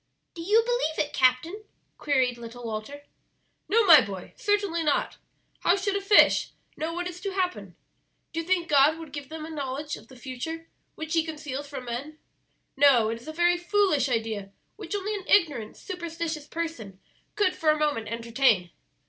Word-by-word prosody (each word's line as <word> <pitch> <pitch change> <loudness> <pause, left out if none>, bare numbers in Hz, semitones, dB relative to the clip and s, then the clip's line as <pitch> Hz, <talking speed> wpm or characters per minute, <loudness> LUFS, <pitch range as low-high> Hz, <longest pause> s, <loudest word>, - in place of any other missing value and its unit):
"Do 335 - -8
you 420 +6 +4
believe 485 -10 0
it, 295 - -15
captain?" 270 +11 +2 0.4
queried 260 -4 +1
little 235 +1 -9
Walter. 230 +6 -6 0.7
"No, 450 +1 +4
my 320 -7 +9
boy, 195 -2 -8
certainly 405 -5 0
not; 300 -2 0 0.4
how 350 - +3
should 395 0 -1
a 400 - 0
fish 400 +1 +5 0.3
know 315 +1 -3
what 350 +1 -3
is 355 -1 -7
about 395 -2 -3
to - - -2
happen? 360 -1 -2 0.6
Do 330 - -2
you 330 - -4
think 360 -2 +1
God 295 +1 +5
would 325 -3 -10
give 285 -2 -7
them 315 0 -6
a 320 - -8
knowledge 290 0 -4
of 220 - -16
the 260 - -15
future 275 +6 -6 0.3
which 315 0 -5
He 330 -1 +3
conceals 295 -3 -6
from 280 -3 -7
men? 265 +6 -5 0.6
No, 265 -6 +5
it 230 +1 -4
is 245 - -15
a - - -4
very 345 +2 +2
foolish 350 - +2
idea 220 -4 -2 0.3
which - - -6
only 410 +1 -2
an 395 -3 -6
ignorant, 290 - +2
superstitious 335 -4 -5
person 295 - -5 0.4
could 395 -3 +2
for 325 -4 +1
a 305 - +4
moment 295 -8 0
entertain. 230 -5 +1
310 Hz, 180 wpm, -26 LUFS, 255-350 Hz, 0.7 s, my